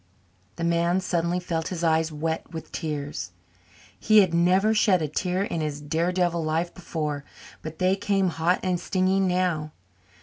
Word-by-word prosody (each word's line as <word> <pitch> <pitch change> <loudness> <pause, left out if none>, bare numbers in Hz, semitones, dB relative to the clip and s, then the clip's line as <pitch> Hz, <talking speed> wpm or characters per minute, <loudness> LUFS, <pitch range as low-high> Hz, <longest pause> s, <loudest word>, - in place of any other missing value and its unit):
The 170 - -5
man 170 +2 +2
suddenly 175 -1 0
felt 165 -2 -3
his 175 -2 -4
eyes 160 0 +2
wet 160 +2 -3
with 160 -2 -8
tears. 145 - -4 0.7
He 215 -1 +6
had 185 -4 +1
never 185 +5 +3
shed 205 -4 +4
a - - 0
tear 180 +5 -1
in 170 -5 -3
his 150 -2 -3
daredevil 170 +3 0
life 160 +2 -1
before, 150 -5 -4 0.4
but 155 0 -7
they 185 +1 +2
came 195 -1 +1
hot 170 +2 0
and 180 -2 0
stinging 190 +1 +1
now. 175 -4 0
170 Hz, 160 wpm, -25 LUFS, 160-185 Hz, 0.7 s, He